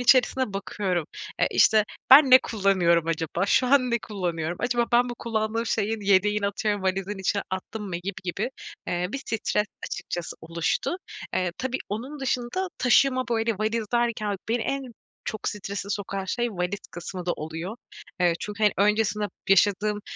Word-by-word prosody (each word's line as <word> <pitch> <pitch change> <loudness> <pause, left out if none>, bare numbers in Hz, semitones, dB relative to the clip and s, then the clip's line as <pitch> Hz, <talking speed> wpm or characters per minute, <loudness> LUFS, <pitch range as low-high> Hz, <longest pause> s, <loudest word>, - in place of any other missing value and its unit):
içerisinde 255 -1 +4
bakıyorum, 190 -4 -2 0.3
e, - - +3
işte 215 -1 +5 0.3
ben 270 +1 +9
ne 255 - +11
kullanıyorum 185 -8 +2
acaba 165 +3 -1
şu 255 - +3
an 255 -1 +4
ne 235 - +2
kullanıyorum 175 -6 -3
acaba 240 -1 +1
ben 245 +1 +4
bu 240 - -4
kullandığım 225 0 -2
şeyin 220 0 0
yedeğini 200 +1 +3
atıyorum 205 0 -1
"Valizin 190 +1 -1
içine 195 +1 0
attım 195 +3 -5
mı?" 175 - -3
gibi 185 +3 -5
gibi, 195 +7 -2 0.4
eee, 175 +1 -1
bir 275 - -2
stres 220 -3 -1 0.2
açıkçası 175 -2 -5
oluştu. 170 - -1 0.4
Eee, 180 -2 0
tabii 260 0 -2
onun 255 +8 -5
dışında 265 +8 -1
taşıma 255 +1 +4
böyle 225 -2 0
valiz 220 +1 0
derken 230 -4 0
beni 230 +1 +1
en 275 +3 -2 0.4
çok 220 - -3
strese 200 0 -5
sokan 195 -1 -3
şey 240 +5 -1
valiz 180 0 -2
kısmı 175 +1 -7
da 175 - +2
oluyor. 165 +7 -5 0.4
Eee, 175 -1 +4
çünkü, 210 +1 -5
hani, 210 - +5
öncesinde 210 +1 +2 0.2
yaşadığım, 205 +2 +3
210 Hz, 160 wpm, -26 LUFS, 190-235 Hz, 0.4 s, ne